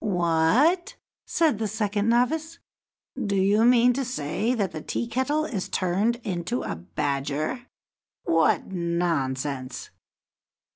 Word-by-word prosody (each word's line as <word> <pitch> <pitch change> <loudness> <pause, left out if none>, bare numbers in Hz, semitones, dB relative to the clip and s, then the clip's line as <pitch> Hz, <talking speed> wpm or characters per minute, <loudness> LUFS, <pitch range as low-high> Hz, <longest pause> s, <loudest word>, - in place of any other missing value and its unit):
"What!" 195 - +2 0.3
said 310 -10 +2
the 220 - -1
second 210 0 -1
novice. 315 +8 +1 0.7
"Do 200 -2 -1
you 200 +3 +3
mean 245 0 +5
to 270 +2 -1
say 230 - -1
that 200 -6 -1
the 155 - -6
Tea 240 - -3
kettle 260 +6 0
is 210 -11 -4
turned 195 +6 +1
into 185 +4 -2
a - - -3
badger? 140 - -3 0.6
What 165 -1 +2
nonsense!" 145 -7 -2
200 Hz, 115 wpm, -25 LUFS, 165-245 Hz, 0.7 s, mean